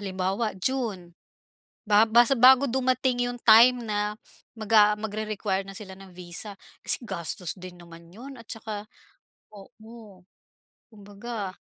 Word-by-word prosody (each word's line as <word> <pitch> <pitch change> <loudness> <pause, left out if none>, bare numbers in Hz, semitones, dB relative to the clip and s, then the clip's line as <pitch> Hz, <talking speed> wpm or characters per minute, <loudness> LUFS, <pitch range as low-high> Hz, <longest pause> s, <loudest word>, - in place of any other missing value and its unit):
halimbawa, 195 +3 -2
June 210 -9 -3 0.7
ba 210 +1 +5
bas 235 +3 +4
bago 260 +3 +6
dumating 255 -1 0
yung 245 - -8
time 240 +2 +6
na 210 0 -2 0.4
maga 215 -1 +4
magre-require 210 -2 -3
na 195 - -9
sila 190 -2 -9
ng 190 -1 -14
visa 180 +3 -6 0.3
kasi - - 0
gastos 170 -2 -4
din 180 -1 -11
naman 170 -1 -15
'yon 260 +6 -11
at - - -14
tsaka 215 -3 -7 0.7
oo, 215 -1 -15 0.7
kumbaga 205 -1 -8
210 Hz, 125 wpm, -25 LUFS, 190-235 Hz, 0.7 s, bago